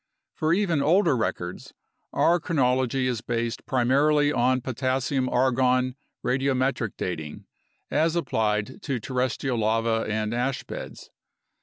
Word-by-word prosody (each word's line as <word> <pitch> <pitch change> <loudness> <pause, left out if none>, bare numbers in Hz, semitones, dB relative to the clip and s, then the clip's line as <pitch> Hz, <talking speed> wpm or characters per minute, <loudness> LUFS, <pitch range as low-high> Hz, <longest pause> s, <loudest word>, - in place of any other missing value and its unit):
For 155 0 0
even 175 -5 +2
older 165 +1 +3
records, 90 -6 -4 0.4
our 175 +1 +3
chronology 130 -5 +1
is 125 -3 -1
based 115 0 -3
primarily 145 +4 +3
on 130 +1 +2
potassium 130 +1 -1
argon 130 0 +2 0.3
radiometric 130 -3 0
dating 80 -4 -5 0.5
as 160 +1 +2
applied 110 -7 -1
to 135 -4 -2
terrestrial 125 +1 -1
lava 115 +1 +1
and 110 0 -1
ash 125 +2 -1
beds. - - -8
130 Hz, 115 wpm, -25 LUFS, 115-135 Hz, 0.5 s, older